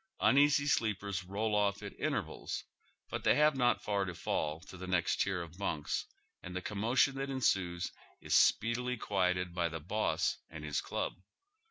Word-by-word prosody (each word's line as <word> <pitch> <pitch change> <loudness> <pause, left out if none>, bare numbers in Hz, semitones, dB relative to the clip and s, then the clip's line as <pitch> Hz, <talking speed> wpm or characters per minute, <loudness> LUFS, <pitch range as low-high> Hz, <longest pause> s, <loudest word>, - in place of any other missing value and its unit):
Uneasy 145 +1 +5
sleepers 100 -7 0
roll 105 +4 -2
off 100 -1 +1
at - - -6
intervale, - - -3 0.6
but - - -3
they - - +5
have 150 0 +4
not 120 -2 +2
far 100 -1 +1
to 90 -2 -4
fall 80 -3 -1
to 95 - -12
the 95 0 -7
next 90 -2 +1
tier 95 -3 0
of 85 +2 -12
bunks, 80 -7 -2 0.3
and 90 0 -8
the - - 0
commotion 115 +6 +2
that 135 +1 -3
ensues 95 -10 0 0.3
is - - -3
speedily 125 +2 +3
quieted 90 -4 0
by 85 -1 0
the 80 0 -5
boss 105 +8 0
and 80 -2 -8
his 75 -1 -1
dub. - - -1
100 Hz, 170 wpm, -33 LUFS, 90-115 Hz, 0.6 s, Uneasy